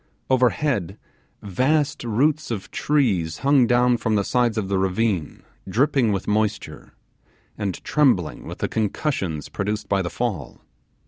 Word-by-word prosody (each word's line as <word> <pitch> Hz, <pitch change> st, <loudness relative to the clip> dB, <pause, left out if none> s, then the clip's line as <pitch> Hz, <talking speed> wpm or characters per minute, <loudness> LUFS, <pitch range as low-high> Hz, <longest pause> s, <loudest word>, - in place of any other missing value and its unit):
Overhead, 125 Hz, -, +1 dB, 0.5 s
vast 135 Hz, -, 0 dB
roots 140 Hz, +7 st, +1 dB
of 105 Hz, -5 st, -5 dB
trees 100 Hz, -, +1 dB
hung 140 Hz, -3 st, +5 dB
down 125 Hz, 0 st, +3 dB
from 110 Hz, -1 st, 0 dB
the 100 Hz, -, +2 dB
sides 120 Hz, 0 st, +1 dB
of 105 Hz, -3 st, -1 dB
the 95 Hz, -1 st, 0 dB
ravine 95 Hz, -3 st, -1 dB, 0.3 s
dripping 130 Hz, +1 st, +2 dB
with 95 Hz, -2 st, -2 dB
moisture, 105 Hz, 0 st, -2 dB, 0.6 s
and 100 Hz, -4 st, -3 dB
trembling 125 Hz, -, +1 dB
with -, -, -7 dB
the -, -, -1 dB
concussions 100 Hz, -, -2 dB
produced 105 Hz, +2 st, -3 dB
by 100 Hz, -1 st, +1 dB
the 85 Hz, -, -3 dB
fall. 105 Hz, -, -4 dB
110 Hz, 135 wpm, -23 LUFS, 95-130 Hz, 0.6 s, hung